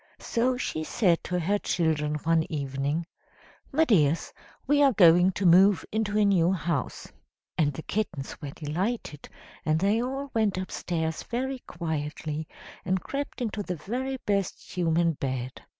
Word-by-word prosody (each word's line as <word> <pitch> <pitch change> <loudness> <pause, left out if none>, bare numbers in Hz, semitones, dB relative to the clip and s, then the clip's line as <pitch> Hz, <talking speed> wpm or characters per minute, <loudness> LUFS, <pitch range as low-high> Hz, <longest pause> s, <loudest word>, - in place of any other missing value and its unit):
So 250 +2 0
she 155 -10 -2
said 175 0 +2
to 180 0 -1
her 200 +5 +1
children 155 -5 0
one 165 -1 +1
evening 140 +2 -2 0.7
"'My 320 +4 +3
dears, 165 - +2 0.3
we 290 +1 +3
are 275 -2 +5
going 175 -1 +6
to 190 - -2
move 185 +2 +6
into 215 -1 0
a 210 - +4
new 185 -3 +4
house.' 165 -7 -3 0.4
"And 150 -3 +2
the 155 - -7
kittens 190 -10 -3
were 145 - -5
delighted, 155 - -4 0.3
and 155 0 +2
they 205 +5 +2
all 270 +2 -4
went 215 -4 +1
upstairs 165 -3 -3
very 260 +2 -3
quietly, 155 -1 -4 0.4
and 190 +1 0
crept 280 -2 -4
into 215 -2 -2
the 180 -2 -3
very 255 - -3
best 200 -2 -2
human 170 -1 +2
bed. 130 -3 -4
180 Hz, 150 wpm, -27 LUFS, 155-215 Hz, 0.7 s, going